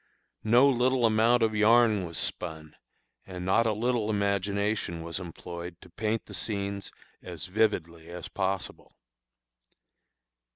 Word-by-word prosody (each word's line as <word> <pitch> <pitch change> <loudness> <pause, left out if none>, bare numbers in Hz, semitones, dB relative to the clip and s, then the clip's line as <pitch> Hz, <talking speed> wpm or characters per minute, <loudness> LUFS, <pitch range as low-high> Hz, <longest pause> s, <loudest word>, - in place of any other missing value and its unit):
No 120 +5 +5
little 130 -1 +2
amount 115 +2 +4
of 110 -1 +2
yarn 105 -2 +4
was 85 -2 -7
spun, 80 -1 -5 0.5
and 90 -1 -6
not 115 +5 +3
a - - +2
little 115 0 0
imagination 100 -3 -1
was 85 +2 -5
employed 85 0 -8
to 90 - -15
paint 110 +3 -2
the - - -12
scenes 100 -2 -3 0.3
as - - -7
vividly 85 -5 -1
as 85 0 -7
possible. 95 -1 -4
100 Hz, 125 wpm, -28 LUFS, 90-110 Hz, 0.5 s, No